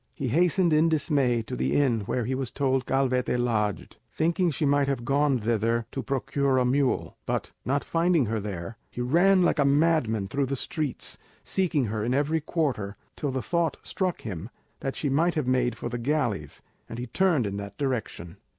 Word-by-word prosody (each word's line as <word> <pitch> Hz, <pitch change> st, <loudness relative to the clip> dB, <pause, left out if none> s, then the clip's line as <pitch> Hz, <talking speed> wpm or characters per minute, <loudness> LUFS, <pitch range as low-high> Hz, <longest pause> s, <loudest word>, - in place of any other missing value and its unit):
He 135 Hz, -6 st, -2 dB
hastened 175 Hz, +4 st, +3 dB
in 155 Hz, +2 st, +4 dB
dismay 140 Hz, -7 st, +1 dB
to -, -, -5 dB
the 65 Hz, +2 st, 0 dB
inn 130 Hz, -6 st, +3 dB
where 125 Hz, -3 st, -1 dB
he 130 Hz, -, -1 dB
was 130 Hz, -2 st, -2 dB
told 135 Hz, -1 st, 0 dB
Calvete 130 Hz, -2 st, +1 dB
lodged, 110 Hz, -5 st, -1 dB
thinking 170 Hz, +3 st, +1 dB
she 155 Hz, 0 st, -1 dB
might 140 Hz, 0 st, +3 dB
have 130 Hz, -4 st, -2 dB
gone 140 Hz, +1 st, +2 dB
thither 115 Hz, +1 st, 0 dB
to 135 Hz, -, -3 dB
procure 135 Hz, 0 st, 0 dB
a 125 Hz, -, +3 dB
mule; 130 Hz, +1 st, 0 dB
but, -, -, -2 dB
not 140 Hz, +3 st, 0 dB
finding 165 Hz, -4 st, +2 dB
her 110 Hz, 0 st, -1 dB
there, 100 Hz, +1 st, -6 dB
he -, -, -9 dB
ran 175 Hz, +9 st, +4 dB
like 170 Hz, -, +2 dB
a -, -, +5 dB
madman 140 Hz, -8 st, +2 dB
through 135 Hz, +6 st, -1 dB
the 140 Hz, -, -1 dB
streets, 150 Hz, 0 st, -3 dB, 0.2 s
seeking 165 Hz, -8 st, +1 dB
her 105 Hz, 0 st, -2 dB
in 120 Hz, +3 st, 0 dB
every 150 Hz, +3 st, +1 dB
quarter, 130 Hz, -, -2 dB, 0.2 s
till 145 Hz, -, -2 dB
the 130 Hz, -1 st, -2 dB
thought 170 Hz, -4 st, 0 dB
struck 185 Hz, -3 st, -2 dB
him 95 Hz, -1 st, -6 dB, 0.3 s
that 135 Hz, -, -3 dB
she 150 Hz, -, -2 dB
might 165 Hz, +6 st, +2 dB
have 155 Hz, -4 st, 0 dB
made 125 Hz, -1 st, +1 dB
for -, -, -4 dB
the 120 Hz, 0 st, -4 dB
galleys, 120 Hz, -, -1 dB, 0.3 s
and 115 Hz, -, -6 dB
he 120 Hz, -, -4 dB
turned 155 Hz, -, +2 dB
in 100 Hz, 0 st, -3 dB
that 100 Hz, 0 st, -7 dB
direction. 120 Hz, -, -3 dB
135 Hz, 195 wpm, -27 LUFS, 115-150 Hz, 0.3 s, a